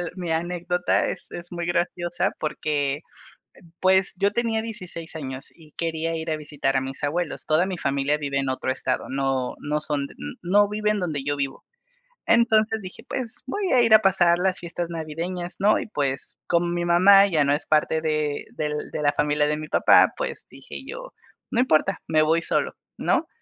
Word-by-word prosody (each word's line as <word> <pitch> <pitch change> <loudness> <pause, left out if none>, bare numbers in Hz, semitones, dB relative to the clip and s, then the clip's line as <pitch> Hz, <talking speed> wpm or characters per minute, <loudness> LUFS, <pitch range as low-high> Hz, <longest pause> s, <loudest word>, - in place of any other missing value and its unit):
mi 175 -3 -4
anécdota 175 +2 0
es - - -5
es 175 0 -8
muy 175 -1 -4
graciosa 175 +1 0
porque, 150 -2 -1 0.8
pues, 190 +1 +3
yo 200 0 +3
tenía 225 -1 0
16 180 -7 -6
años 135 -3 -6
y 155 -3 -18
quería 165 0 -2
ir 160 0 -4
a 155 - 0
visitar 145 -3 -2
a 135 - +3
mis 135 +2 -6
abuelos. 155 +2 -2
Toda 160 +4 +3
mi 185 -2 -4
familia 140 +1 +1
vive 140 -2 -2
en 135 -1 -1
otro 130 0 -2
estado, 130 0 -2
no 135 -1 -1
no 150 +1 -1
son 145 -2 -2 0.4
no 205 +3 +4
viven 210 0 0
donde 155 -6 -2
yo 145 0 -1
vivo. 140 -1 -4 0.6
Entonces, 220 -2 +3
dije: 185 -1 -9
"Pues, 245 -2 -4
voy 400 +8 -2
a 250 - +6
ir 230 -2 +4
a 215 - +10
pasar 180 -4 +3
las 190 0 +1
fiestas 170 0 -4
navideñas", 170 +2 -5
¿no?, 205 +2 +4
y - - -4
pues, 140 -7 -3
con 170 0 +1
mi 175 0 -1
mamá 195 +3 +7
ya 155 -6 +2
no 140 - +2
es 145 - -2
parte 155 +1 +2
de 155 -2 -1
del 150 -1 -2 0.2
de - - -2
la 145 -1 +3
familia 150 0 +1
de 150 0 0
mi 155 0 -6
papá, - - +5
pues, - - -5
dije - - -10
yo: - - -8 0.4
"No 240 - +1
importa, 195 -6 +2
me 155 -1 +3
voy 160 +2 +3
solo", - - -1 0.2
¿no?, - - +1
165 Hz, 185 wpm, -24 LUFS, 150-190 Hz, 0.8 s, a